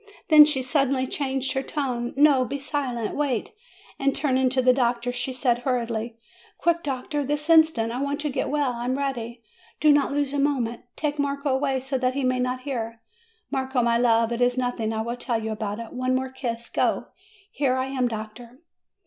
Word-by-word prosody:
Then 305 -2 +10
she 285 -3 0
suddenly 270 -1 +1
changed 270 0 -2
her 265 - 0
tone: 255 -4 -3
"No! 285 -3 +5
Be 255 +3 -3
silent! 265 -5 -3
Wait!" 275 -6 -1 0.5
And 275 0 +1
turning 260 -3 +2
to 260 +1 0
the 255 0 +6
doctor, 245 -1 0
she 245 +2 -3
said 250 -2 +1
hurriedly: 235 -2 -2 0.4
"Quick, 340 0 +1
doctor! 285 +1 -2
this 295 +2 -2
instant! 315 -9 +4
I 250 +3 -3
want 280 0 -1
to 300 -1 -2
get - - -2
well. 285 -3 0
I 235 0 -5
am 255 +2 0
ready. 240 -4 -4 0.4
Do 305 - +5
not 290 -1 +3
lose 285 -1 -1
a 285 - 0
moment. 255 -5 0
Take 295 -1 -2
Marco 280 0 -1
away, 265 0 +1
so 265 0 -2
that 255 0 0
he 280 - -1
may 255 0 +1
not 250 0 -1
hear. 230 -4 -4 0.5
Marco, 265 -2 0
my 235 0 +2
love, 230 -1 +3
it 235 +1 -2
is 245 +1 +2
nothing. 245 -3 -1
I 220 0 -2
will 235 +2 -4
tell 240 -2 -1
you 220 0 -4
about 210 -1 -3
it. 230 -1 -8
One 255 0 0
more 260 0 -2
kiss. 235 -3 -4
Go! - - 0 0.5
Here 265 -3 +1
I 260 0 0
am, 265 -2 0
doctor." 230 +2 -7
255 Hz, 200 wpm, -25 LUFS, 240-280 Hz, 0.5 s, Then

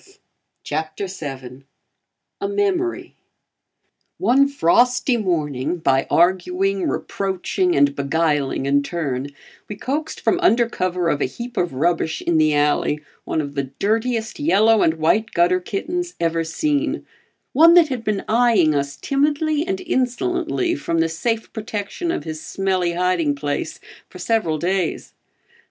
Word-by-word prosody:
A 400 - 0
MEMORY 390 -3 -1 1.0
One 275 -3 +4
frosty 250 +1 +2
morning, 160 - -1
by 135 -5 +1
arguing, 185 +2 +2
reproaching 190 -1 -1
and 140 0 +3
beguiling 145 -1 0
in 140 +1 +3
turn, 140 -4 -3 0.4
we 210 - -5
coaxed 290 +9 -3
from 360 - +1
under 240 -10 +3
cover 180 -5 -1
of 150 -3 0
a - - +3
heap 240 - -7
of 175 -8 -1
rubbish 160 +2 0
in 170 -2 +2
the 155 -1 +3
alley, 150 0 +1 0.2
one 160 - -1
of 145 -1 -6
the 140 -1 -2
dirtiest 225 +3 -1
yellow 225 -7 +4
and 160 - +3
white 210 +8 +1
gutter 175 +2 +3
kittens 350 - -4
ever 165 -1 0
seen; 290 - -1 0.5
one 330 +5 +7
that 335 -3 +6
had 250 -4 -3
been 210 -3 -2
eyeing 220 -9 +3
us 140 -1 -2
timidly 300 +3 0
and 380 0 -2
insolently 350 +4 -1
from 295 - -2
the 165 0 +2
safe 225 +7 -2
protection 220 - -4
of - - -2
his 155 -1 -6
smelly 185 -3 -1
hiding 175 -4 +1
place 145 0 -3 0.3
for - - -12
several 215 -9 0
days. 180 +1 -2
195 Hz, 135 wpm, -21 LUFS, 160-260 Hz, 1.0 s, one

